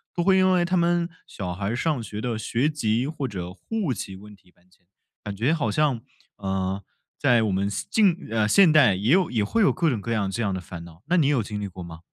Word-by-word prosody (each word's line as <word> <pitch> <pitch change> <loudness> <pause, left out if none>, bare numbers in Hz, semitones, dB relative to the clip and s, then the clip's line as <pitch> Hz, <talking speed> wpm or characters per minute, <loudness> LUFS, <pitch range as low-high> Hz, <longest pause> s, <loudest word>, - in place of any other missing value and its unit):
都 175 - 0
会 190 +1 +4
因 185 0 +4
为 175 -1 +2
他 185 +2 0
们 170 -1 +2 0.2
小 90 -3 -5
孩 100 +3 -5
儿 110 - -1
上 150 0 -1
学 105 -1 -7
的 115 0 -2
学 120 +5 0
籍 120 -4 0
或 150 -3 -3
者 90 -5 -6
户 190 - -3
籍 95 -1 -6
问 105 +2 -13
题 90 -2 -26
搬 90 - -32
迁， 90 -1 -30 0.4
感 105 -1 -5
觉 120 +10 +1
好 145 -9 0
像， 140 -3 +1 0.4
呃， 95 0 -2 0.4
在 120 -2 +3
我 105 - 0
们 95 +1 0
现 100 - -4
近， 195 -5 +2
呃， 110 -2 +1
现 180 - +6
代 140 -11 +6
也 105 +6 0
有 185 0 +3
也 110 -4 +1
会 225 - 0
有 195 - +5
各 170 -3 +1
种 115 -5 -2
各 115 - -5
样 100 -3 0
这 115 - -3
样 105 -3 0
的 95 - -3
烦 90 -1 -9
恼， 85 +1 -16
那 180 +3 +1
你 155 -5 +3
有 140 -6 +2
经 105 0 -5
历 100 - -3
过 90 -1 -9
吗？ 80 -1 -10
115 Hz, 275 characters per minute, -24 LUFS, 100-155 Hz, 0.4 s, 现